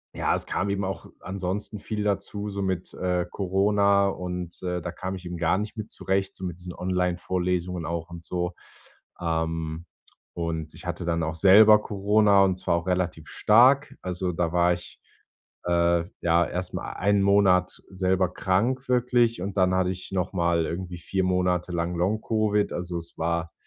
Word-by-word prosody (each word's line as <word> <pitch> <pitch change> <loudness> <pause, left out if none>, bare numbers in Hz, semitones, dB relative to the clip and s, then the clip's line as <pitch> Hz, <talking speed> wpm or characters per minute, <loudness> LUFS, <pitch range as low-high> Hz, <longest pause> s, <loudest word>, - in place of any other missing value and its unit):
ja, - - +1
es - - -4
kam 100 - -1
eben 100 0 -1
auch 95 0 -5
ansonsten 95 +3 -4
viel 105 +1 -4
dazu, 100 +1 -2
so 100 0 -4
mit, 95 -2 -3
äh, 90 -1 0
Corona 100 +1 +2
und, 90 -2 -5
äh, 90 -1 -2
da 90 - -4
kam 95 +2 -5
ich 90 -1 -10
eben 85 0 -5
gar 85 +2 +2
nicht 105 +2 -5
mit 110 0 -6
zurecht, 95 0 -1
so 95 - -8
mit 90 -2 -5
diesen 90 0 -8
Online-Vorlesungen 90 -1 -1
auch 85 +1 -4
und 85 -1 -9
so. 90 0 -2 0.7
Ähm, 80 -1 -2 0.5
und 80 -2 -4
ich - - -12
hatte 85 0 -4
dann 85 -1 0
auch 80 0 -2
selber 105 +5 +7
Corona, 100 0 +3
und 95 -1 +1
zwar 90 - 0
auch 85 +2 -5
relativ 90 -4 -1
stark. 130 +6 +4
Also 90 0 -2
da 85 0 -1
war 90 0 +4
ich, 90 0 -8 0.7
äh, 85 -1 +2 0.2
ja, 85 0 +3
erstmal 90 +1 -5
einen 100 +1 +2
Monat 95 -2 +3
selber 95 -1 +1
krank 120 +10 0
wirklich, 120 -3 +2
und 95 +1 -4
dann 95 -1 +3
hatte 95 0 +2
ich 90 0 -8
nochmal 85 -3 0
irgendwie 90 +1 -5
4 95 +3 -2
Monate 90 -1 0
lang 85 +1 -1
Long 95 +6 0
Covid, 105 -2 +1
also 90 0 -4
es 85 0 -8
war, 85 0 -1
90 Hz, 170 wpm, -26 LUFS, 85-100 Hz, 0.7 s, selber